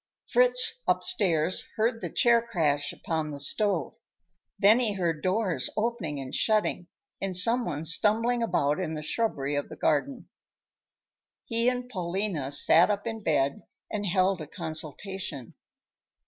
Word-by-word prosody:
Fritz, - - +4
upstairs, 185 - +2
heard 225 +1 0
the - - -4
chair 235 -1 +3
crash 150 -11 0
upon 160 -2 -4
the 145 -1 -7
stove. 195 - -1 0.6
Then 210 +4 +5
he 220 -5 0
heard 170 -5 -2
doors 190 -1 0
opening 210 -10 -2
and 130 -1 -7
shutting, 210 -5 0 0.3
and 190 -2 0
some 230 +6 +4
one 150 -3 -4
stumbling 225 +8 +1
about 150 -9 0
in 160 -4 -3
the 155 - -6
shrubbery 145 -7 -2
of 145 - -3
the - - -9
garden. 245 - -1 1.2
He 230 +1 +1
and 250 0 -4
Paulina 180 - -3
sat 160 +5 +5
up 205 -1 -2
in 225 -1 -5
bed 140 -7 0 0.3
and 205 -2 -3
held 185 0 +1
a 155 - -7
consultation. 160 - -5
190 Hz, 140 wpm, -27 LUFS, 155-230 Hz, 1.2 s, Then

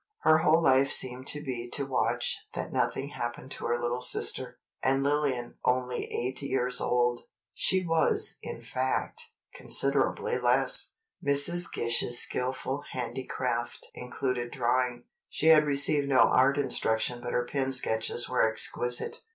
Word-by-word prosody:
Her 155 0 +4
whole 160 0 +3
life 135 -1 +3
seemed 130 +1 -2
to 150 0 -6
be 120 -4 -5
to 140 - -1
watch 135 -1 -1
that - - -5
nothing 140 +1 -1
happened 120 0 -6
to - - -5
her 120 0 0
little 120 +1 -2
sister. 125 - +1 0.2
And 135 +1 +1
Lillian 140 -4 -1
only 125 0 -1
eight 125 +3 -4
years 125 -2 -1
old." 120 0 0 0.3
She 190 -1 0
was, 415 - +2
in - - -8
fact, - - -2 0.3
considerably - - 0
less. - - +3 0.3
Mrs. 155 +5 +2
Gish's 120 +1 0
skillful 130 +2 -2
handicraft 125 -1 -4
included 125 -1 -4
drawing. 125 -1 -1 0.3
She 160 - +1
had 155 -1 +6
received 140 0 +3
no 130 -1 +4
art 135 +2 +4
instruction 120 -3 0
but 120 - -5
her 120 - 0
pen 135 +1 -2
sketches 120 -2 0
were 125 - 0
exquisite. 120 +2 +2
130 Hz, 140 wpm, -28 LUFS, 120-140 Hz, 0.3 s, had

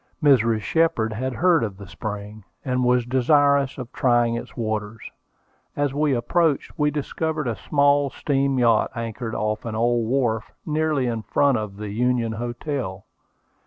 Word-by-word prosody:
Mrs. 115 -6 +4
Shepard 160 -7 +1
had 130 +4 -3
heard 170 0 +3
of 100 -4 -4
the 100 - -10
spring, 105 +2 -7 0.2
and 125 -1 0
was 125 -1 +2
desirous 140 +2 +3
of 125 -2 -8
trying 120 -2 +2
its 115 - -6
waters. 110 -1 -4 0.6
As 145 -2 0
we 145 -1 +1
approached, 150 +5 +1
we 150 0 +2
discovered 155 0 -2
a 115 - -1
small 140 +1 +2
steam 135 -1 0
yacht 115 -3 +3
anchored 115 0 -4
off 105 0 -2
an 115 -2 -4
old 120 0 +1
wharf, 120 -4 0
nearly 155 -3 0
in 115 -2 -2
front 140 +2 +2
of 105 -2 -6
the 105 0 -6
Union 120 +1 0
Hotel. 120 -3 -4
125 Hz, 155 wpm, -23 LUFS, 110-140 Hz, 0.6 s, Mrs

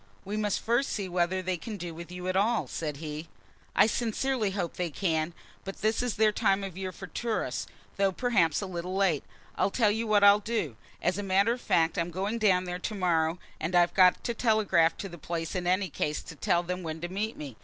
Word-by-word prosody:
"We 205 +2 -3
must 210 -2 0
first 240 +4 +1
see 200 -3 -2
whether 180 +1 0
they 185 0 -1
can 210 +6 -6
do 175 -2 -6
with 170 +2 -9
you 180 0 -6
at 185 - 0
all," 220 +4 +2
said 150 -3 -4
he. 155 +1 -6 0.5
"I 205 - +7
sincerely 230 +1 0
hope 190 -3 -3
they 180 -1 -2
can; 160 -1 0 0.3
but 195 +1 -8
this 220 +1 +2
is 245 -3 -1
their 215 0 +4
time 195 -1 +1
of 190 -3 -6
year 190 0 -4
for 190 - -9
tourists, 225 +4 -2 0.3
though 195 -1 +3
perhaps 190 -8 +2
a - - -3
little 180 0 -4
late. 190 -7 +2 0.3
I'll - - +2
tell 210 0 +3
you 225 +2 -1
what 210 -1 +4
I'll 205 0 +8
do. 210 - -2 0.3
As 185 +3 +1
a - - 0
matter 200 +3 +3
of 245 - -7
fact, 165 0 +2
I'm 170 +1 0
going 195 +6 -2
down 190 -4 +4
there 180 0 -4
to 215 +4 -4
morrow, 170 -3 +1 0.2
and 170 +4 -2
I've 175 0 +4
got 185 -1 +5
to 235 - -1
telegraph 215 -8 +3
to 195 - -5
my 170 - -9
place 165 0 -4
in 180 -1 -2
any 185 +1 +1
case 150 0 -2
to 165 - -10
tell 175 +3 +1
them 180 +1 -3
when 160 -2 -5
to 175 - -2
meet 205 +5 -3
me. 140 -6 -7
185 Hz, 230 wpm, -29 LUFS, 170-210 Hz, 0.5 s, I'll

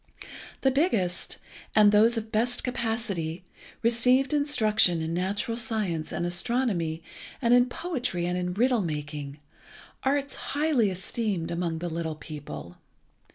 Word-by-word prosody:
The 265 - +4
biggest, 225 - +1 0.4
and 210 -1 +7
those 225 +3 +5
of 220 0 -4
best 240 +3 +1
capacity, 220 -9 -2 0.4
received 250 +4 +3
instruction 220 - +3
in 160 +1 -2
natural 195 +6 -1
science 210 -9 -2
and 175 - -2
astronomy, 175 -4 0 0.4
and 240 -2 +3
in 245 0 +6
poetry 250 - -2
and 180 0 -1
in 180 0 -2
riddle 245 +1 +3
making, 150 -3 -4 0.6
arts 280 +1 0 0.2
highly 290 -8 +3
esteemed 190 -1 -2
among 170 -1 -1
the 175 +2 -3
little 165 -1 -3
people. 140 - -8
210 Hz, 125 wpm, -27 LUFS, 170-245 Hz, 0.6 s, and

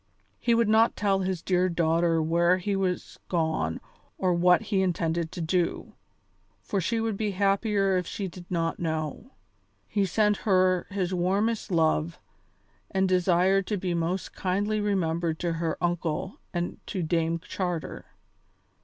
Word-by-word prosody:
He 235 -1 +2
would 230 -1 +3
not 220 +2 +4
tell 200 -2 +1
his 185 -2 -2
dear 185 0 +2
daughter 165 -1 +2
where 170 +3 +3
he 195 +2 -2
was 185 -2 -2
gone 160 - 0 0.4
or 185 -1 +1
what 180 +3 +4
he 195 -2 0
intended 170 -2 -1
to 175 - -5
do, 170 +2 -1 0.7
for 195 - -1
she 230 +6 0
would 225 -2 -1
be 210 0 -2
happier 200 0 +2
if 180 - -2
she 200 - -4
did 175 0 -11
not 165 -2 -1
know. 160 - -3 0.6
He 200 -2 0
sent 210 +3 +2
her 185 -3 +2
his 190 -2 -2
warmest 200 +6 0
love, 165 -1 +1 0.7
and 190 0 +1
desired 185 +1 +3
to 210 - -1
be 180 -1 -2
most 170 +2 -2
kindly 205 +3 -1
remembered 170 -5 0
to 170 -1 0
her 165 -1 -2
uncle 175 +1 -2
and 175 0 -3
to 185 -4 -3
Dame 165 0 0
Charter. 175 -1 -4
180 Hz, 150 wpm, -27 LUFS, 170-195 Hz, 0.7 s, not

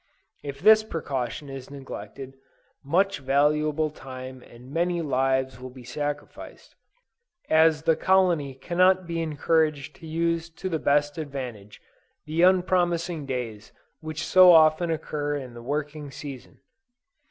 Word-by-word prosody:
If 140 -1 -7
this 215 0 +7
precaution 145 - -4
is 135 -1 -8
neglected, 135 -1 -9 0.5
much 185 +5 +1
valuable 150 +3 +1
time 130 -2 -9
and 125 +3 -15
many 175 +1 0
lives 130 -2 0
will 130 0 -8
be 125 0 -13
sacrificed, 145 +4 -6 0.8
as 160 -1 +4
the 165 0 +3
colony 175 -8 +2
cannot 185 +6 +2
be 165 -1 -3
encouraged 155 -2 0
to 165 - -11
use 165 +1 -1
to 185 +2 -4
the 160 -3 -1
best 145 +2 +1
advantage 125 -9 -7 0.4
the 155 +2 -1
unpromising 175 -3 +2
days 115 -5 -5 0.3
which 155 0 -5
so 185 -1 +7
often 160 +1 +5
occur 150 -2 -2
in 130 -4 -6
the 120 - -10
working 145 +3 -4
season. 135 -2 -10
150 Hz, 130 wpm, -25 LUFS, 135-165 Hz, 0.8 s, this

